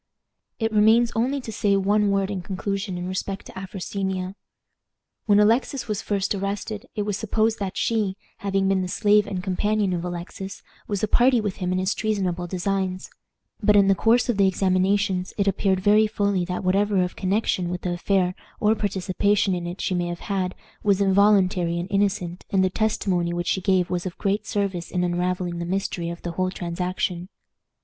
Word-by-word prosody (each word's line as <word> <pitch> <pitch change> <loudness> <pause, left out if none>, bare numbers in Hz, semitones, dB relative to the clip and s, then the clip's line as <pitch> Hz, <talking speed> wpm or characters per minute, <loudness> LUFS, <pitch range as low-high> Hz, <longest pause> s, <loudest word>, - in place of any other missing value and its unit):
It 225 -1 -1
remains 220 +3 +5
only 255 +5 +1
to 230 - -7
say 200 -1 +2
one 205 +1 +2
word 195 0 +1
in 195 -3 -3
conclusion 195 +1 -3
in 175 0 -4
respect 195 +1 -4
to - - -10
Afrosinia. 190 0 -4 0.9
When 205 -1 +5
Alexis 235 +5 +2
was 210 -1 -2
first 200 -1 -1
arrested, 200 +1 -4
it 210 - -1
was 205 -1 -2
supposed 220 +1 0
that 195 -2 -4
she, 210 -4 0 0.2
having 195 -1 0
been 195 -1 +2
the 185 - -2
slave 205 +2 +3
and 185 -3 -4
companion 205 +1 0
of 175 -1 -2
Alexis, 180 +2 -6 0.2
was 205 -2 -2
a - - +3
party 245 +3 +4
with 205 -3 -3
him 180 -2 -2
in 185 - +1
his 185 +1 +1
treasonable 190 -5 -1
designs; 185 +1 -2 0.5
but 210 0 +4
in 200 -1 +5
the - - +6
course 230 +5 +3
of 240 -5 0
the 200 -1 +5
examinations 190 0 +1
it 200 -1 +1
appeared 195 -1 +1
very 210 +2 +5
fully 200 -4 0
that 180 +1 -4
whatever 195 +1 +2
of 180 - -4
connection 190 -2 0
with 180 0 -4
the 180 - -2
affair, 180 0 +1 0.3
or 215 -2 +4
participation 200 0 +1
in 175 -1 -3
it, 175 +2 -6
she - - -1
may 175 -1 0
have 175 0 -5
had, 185 -2 -2 0.3
was 200 -2 +2
involuntary 190 -3 +3
and 175 +1 -3
innocent, 195 -3 0
and 190 -1 +2
the 185 - +1
testimony 185 -5 0
which 175 0 -2
she 190 - 0
gave 185 -2 +2
was 180 0 -1
of 175 - -7
great 205 +2 -1
service 195 -5 -2
in 180 - -1
unraveling 180 0 -1
the - - -2
mystery 175 -1 -2
of 170 0 -7
the 175 - -3
whole 185 +2 -1
transaction. 180 0 -3
195 Hz, 190 wpm, -24 LUFS, 180-205 Hz, 0.9 s, the